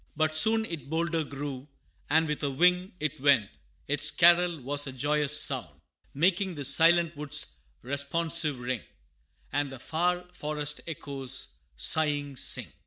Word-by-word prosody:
But 155 0 +1
soon 220 +7 +5
it 155 - -7
bolder 165 0 0
grew, 140 -2 -7 0.4
and 160 +2 +3
with 150 -1 -3
a 145 - -1
wing 180 +6 +2
It 155 -2 -4
went: 135 - +3 0.4
its 145 +1 +1
carol 175 -1 +4
was 145 +3 -1
a - - -4
joyous 145 +2 +2
sound, - - +1 0.4
Making 185 +4 +1
the 145 -2 -4
silent 170 +2 +4
woods 150 - -2 0.3
responsive 145 +3 0
ring, 125 -1 -4 0.7
And 145 0 0
the 135 - -8
far 175 +6 -1
forest 150 -3 -3
echoes, 135 -5 -5 0.3
sighing, 145 - +1
sing. - - -1
150 Hz, 140 wpm, -28 LUFS, 140-170 Hz, 0.7 s, soon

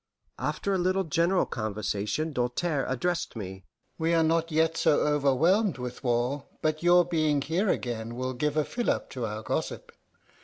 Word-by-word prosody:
After 200 - -1
a 190 - +1
little 185 +2 +1
general 170 +3 +2
conversation 110 +6 -2
Doltaire 135 +4 -1
addressed 165 +6 -1
me: 95 -3 -7 0.3
"We 165 +1 +2
are 165 - +4
not 165 +1 +1
yet 160 +1 +2
so 155 -3 +3
overwhelmed 150 - +2
with 125 +1 -6
war 125 +3 0 0.2
but 155 0 0
your 175 0 +5
being 155 -4 +1
here 180 +8 0
again 115 -4 -2
will 130 +1 -2
give 150 +4 -1
a 155 - +2
fillip 240 -1 -1
to 125 -4 -3
our 105 +1 -5
gossip. - - -3
150 Hz, 160 wpm, -28 LUFS, 125-170 Hz, 0.3 s, your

